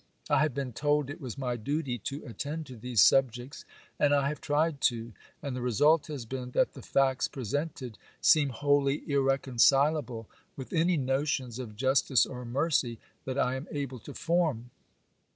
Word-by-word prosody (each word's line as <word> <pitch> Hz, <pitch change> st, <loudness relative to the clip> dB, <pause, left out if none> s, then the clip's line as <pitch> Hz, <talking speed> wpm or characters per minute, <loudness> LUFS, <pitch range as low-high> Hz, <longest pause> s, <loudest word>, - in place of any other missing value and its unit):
I -, -, +5 dB
have 155 Hz, -4 st, +1 dB
been 135 Hz, -3 st, -3 dB
told 145 Hz, +2 st, 0 dB
it 155 Hz, -, -9 dB
was 130 Hz, -1 st, -6 dB
my 125 Hz, -3 st, -2 dB
duty 130 Hz, +2 st, -2 dB
to 140 Hz, +8 st, -6 dB
attend 150 Hz, +6 st, -5 dB
to 130 Hz, -3 st, -10 dB
these 120 Hz, -2 st, +1 dB
subjects, 130 Hz, 0 st, +2 dB, 0.3 s
and 145 Hz, -1 st, +4 dB
I 140 Hz, -1 st, +2 dB
have 150 Hz, -, -6 dB
tried 150 Hz, -1 st, 0 dB
to,—and 120 Hz, +4 st, -3 dB
the 125 Hz, -, -4 dB
result 145 Hz, +6 st, +3 dB
has 145 Hz, -6 st, -6 dB
been 125 Hz, +1 st, -5 dB
that -, -, +3 dB
the 135 Hz, -, -10 dB
facts 135 Hz, +1 st, +1 dB
presented 130 Hz, -1 st, -4 dB, 0.2 s
seem 150 Hz, -3 st, +4 dB
wholly 145 Hz, +2 st, +1 dB
irreconcilable 135 Hz, -2 st, +2 dB, 0.3 s
with 135 Hz, +4 st, -8 dB
any 170 Hz, +1 st, +2 dB
notions 135 Hz, -2 st, -1 dB
of 115 Hz, -5 st, -7 dB
justice 130 Hz, +2 st, +3 dB
or 125 Hz, -1 st, -7 dB
mercy 130 Hz, -2 st, 0 dB, 0.3 s
that 130 Hz, 0 st, -3 dB
I 125 Hz, -2 st, +1 dB
am 130 Hz, +2 st, -5 dB
able 140 Hz, -4 st, -4 dB
to -, -, -11 dB
form. 155 Hz, -9 st, 0 dB
135 Hz, 165 wpm, -29 LUFS, 125-145 Hz, 0.3 s, I